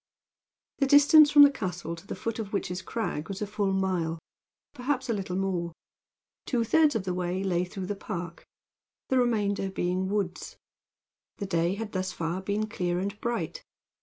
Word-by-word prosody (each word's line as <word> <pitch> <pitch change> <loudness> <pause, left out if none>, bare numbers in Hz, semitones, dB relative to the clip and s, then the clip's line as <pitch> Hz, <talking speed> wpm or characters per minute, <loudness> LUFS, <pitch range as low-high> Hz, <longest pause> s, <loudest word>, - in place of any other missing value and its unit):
The 275 - +3
distance 290 +2 +8
from 290 0 +9
the 285 - +7
castle 180 - -4
to 170 +4 -14
the - - -4
foot 230 0 -4
of 210 -2 -5
Witch's 185 -2 -2
Crag 190 -8 -3
was 195 -1 -4
a 210 - -1
full 205 -1 -1
mile, 185 -4 0 0.6
perhaps 260 -1 -2
a - - +2
little 190 -3 -3
more. 180 -3 -1 0.7
Two 240 -3 +1
thirds 305 +4 +3
of 220 - 0
the 185 -1 -2
way 180 +1 -2
lay 180 -2 +1
through 185 +1 -6
the 205 - -3
park, 175 -4 -6 0.7
the 260 - +3
remainder 205 -5 +1
being 185 0 -1
woods. 200 -3 -3 0.8
The 200 - -4
day 170 -1 +1
had 220 0 -5
thus 185 -1 -2
far 170 +1 -3
been 205 +3 -1
clear 180 -4 -2
and 200 +3 -4
bright. 240 - -3
195 Hz, 175 wpm, -28 LUFS, 180-230 Hz, 0.8 s, from